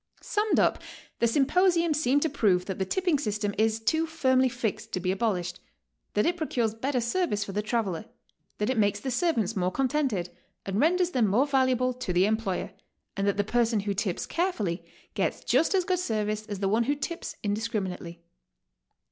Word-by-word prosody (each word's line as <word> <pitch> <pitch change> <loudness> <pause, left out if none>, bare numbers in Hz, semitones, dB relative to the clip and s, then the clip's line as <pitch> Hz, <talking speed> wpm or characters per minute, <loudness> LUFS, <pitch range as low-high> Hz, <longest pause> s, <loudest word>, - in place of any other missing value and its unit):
Summed 420 0 +1
up, - - +2 0.4
the 235 - +3
symiposium 335 +6 +3
seemed 285 -1 +2
to 320 - +1
prove 190 -9 +2
that 190 -1 -5
the 190 - -1
tipping 355 - +1
system 210 -4 -2
is 220 +1 +1
too 315 +9 +1
firmly 260 -5 +2
fixed 235 -4 -3
to 185 - 0
be 185 +1 0
abolished; 185 -4 -1 0.6
that 210 - +3
it 350 0 +1
procures 240 -9 0
better 255 +4 -1
service 235 - 0
for 200 - -6
the 205 +2 -1
traveler; 215 -4 -2 0.5
that 210 +4 0
it 250 - 0
makes 205 -2 +2
the 265 - -3
servants 245 - +1
m'ore 180 -2 +1
contented, 260 -8 0 0.4
and 195 +1 -1
renders 355 +4 +3
them 240 -7 +2
more 225 +8 +3
valuable 260 -2 +2
to 250 -6 -4
the 180 +2 +4
employer; 215 -3 -1 0.4
and 195 0 -1
that 200 - +1
the 205 - +2
person 225 0 +1
who 200 0 -2
tips 195 -2 -2
carefully 220 - -1 0.3
gets - - -1
just 330 - +2
as 370 -2 +2
good 365 -2 +1
service 215 -7 -2
as 205 -2 -4
the 195 0 -1
one 225 +4 +2
w'ho 285 +3 0
tips 335 +3 -4
indiscriminately. 200 -5 -3
225 Hz, 185 wpm, -27 LUFS, 200-285 Hz, 0.6 s, the